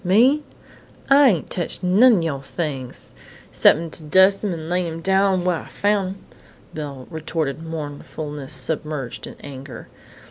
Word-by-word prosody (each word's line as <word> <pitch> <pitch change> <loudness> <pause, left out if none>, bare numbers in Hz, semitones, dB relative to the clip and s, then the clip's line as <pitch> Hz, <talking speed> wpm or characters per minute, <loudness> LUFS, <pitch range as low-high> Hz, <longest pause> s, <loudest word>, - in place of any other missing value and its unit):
"Me?... 240 +11 +4 0.7
I 280 -1 +7
ain't 175 -8 -1
teched 175 +1 -1
none 215 +7 +6
o' - - 0
yoah 150 -5 -2
things, 135 -3 -5 0.4
'cep'n 165 +1 +4
to - - -4
dus' 190 +6 +4
'em 205 - 0
and 160 -2 -5
lay 180 +1 0
'em 165 0 -5
down 190 0 +2
whar 180 -2 +1
I - - -13
foun' 205 -2 0
'em," 190 +1 -9 0.5
Belle 140 -4 -7
retorted, 160 -2 -3
mournfulness 150 -2 -6
submerged 135 0 -3
in - - -10
anger. 135 -3 -9
165 Hz, 150 wpm, -22 LUFS, 145-190 Hz, 0.7 s, I